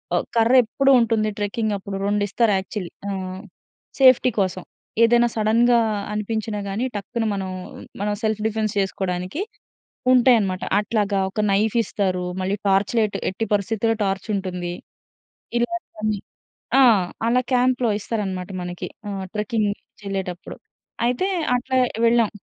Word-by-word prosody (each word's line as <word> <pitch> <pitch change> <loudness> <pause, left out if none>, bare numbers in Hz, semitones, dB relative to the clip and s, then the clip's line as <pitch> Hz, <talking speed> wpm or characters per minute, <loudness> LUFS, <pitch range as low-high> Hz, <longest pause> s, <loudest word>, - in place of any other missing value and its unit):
ఆహ్, - - 0
కర్ర 230 +3 +4
ఎప్పుడూ 275 +4 +2
ఉంటుంది 220 -1 +1
ట్రెక్కింగప్పుడు. 205 -2 -2
రెండిస్తారు 205 +1 +1
యాక్చువల్లీ 190 -1 -6 0.2
ఆహ్, 185 -1 -4 0.6
సేఫ్టీ 255 -1 +6
కోసం. 185 -1 -3 0.4
ఏదైనా 240 +1 +5
సడెన్‌గా 235 +2 +4 0.3
అనిపించినా 210 0 -2
గానీ, 220 +6 -1
టక్కున 225 +4 -3
మనం 190 -1 -3 0.5
మనం 205 0 0
సెల్ఫ్ 215 -1 0
డిఫెన్స్ 215 -1 -1
చేసుకోడానికి 190 - -2 0.7
ఉంటాయనమాట. 230 -7 +4 0.2
అట్లాగా 205 -2 0
ఒక 215 - -6
నైఫిస్తారు. 200 -3 +1 0.2
మళ్ళీ 190 +2 0
టార్చ్ 195 +3 +2
లైట్ 215 -2 +1
ఎట్టి 225 +4 -3
పరిస్థితిలో 220 +2 +1
టార్చుంటుంది. 190 -3 -2 0.9
ఇలాగ 240 +9 0 0.2
కొన్ని 215 -1 -1 0.6
ఆ! - - +7 0.5
అలా 250 +2 +3
క్యాంప్‌లో 250 -1 +2
ఇస్తారనమాట 195 -4 -3
మనకి. 175 0 -5 0.2
ఆహ్, 195 -1 -4
ట్రెక్కింగ్ 215 0 0
నుంచెళ్ళేటప్పుడు 195 -5 -6 0.5
అయితే 250 +10 +1 0.3
అట్లా 260 +1 -1 0.3
వెళ్ళాం. 230 -2 +4
210 Hz, 115 wpm, -22 LUFS, 195-230 Hz, 0.9 s, ఆ